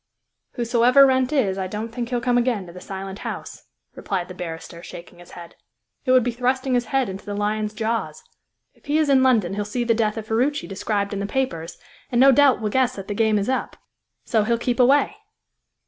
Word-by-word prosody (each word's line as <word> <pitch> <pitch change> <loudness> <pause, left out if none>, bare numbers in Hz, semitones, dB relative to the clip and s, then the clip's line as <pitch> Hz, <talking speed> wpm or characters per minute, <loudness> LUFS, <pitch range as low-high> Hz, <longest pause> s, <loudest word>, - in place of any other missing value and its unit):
"Whosoever 245 +3 +4
Wrent 260 0 +2
is, 205 -10 +1
I 190 - -2
don't 215 +4 -5
think 235 0 -5
he'll 245 -1 0
come 245 0 0
again 235 -6 0
to 170 - -12
the 180 - -10
Silent 195 +1 -7
House," - - -7 0.3
replied 185 -2 -4
the - - -7
barrister, 170 -1 -7
shaking 175 0 -11
his 175 - -15
head. 170 -1 -11 0.5
"It - - +2
would 255 -1 +5
be 245 - -1
thrusting 255 +2 -1
his 245 -1 +1
head 270 -3 0
into 190 +1 -7
the 205 - -5
lion's 210 +1 -1
jaws. 230 - -3 0.5
If - - -29
he 295 +2 +2
is 310 -2 +2
in 270 -1 +5
London 225 -9 +3
he'll 205 +1 -2
see 225 +4 -3
the 235 -1 +2
death 220 -1 0
of 220 - -5
Ferruci 255 +7 0
described 200 +1 -2
in 200 - -3
the 200 - -3
papers, 180 -10 -3 0.3
and 240 - +1
no 270 +2 +8
doubt 270 -2 +4
will 210 -1 -2
guess 255 0 +1
that 195 -1 -8
the - - -1
game 220 0 +2
is 200 - -1
up; 260 0 -2 0.5
so 220 -2 +2
he'll 235 +2 +1
keep 240 +2 -2
away." 280 +10 +4
230 Hz, 220 wpm, -22 LUFS, 200-255 Hz, 0.5 s, no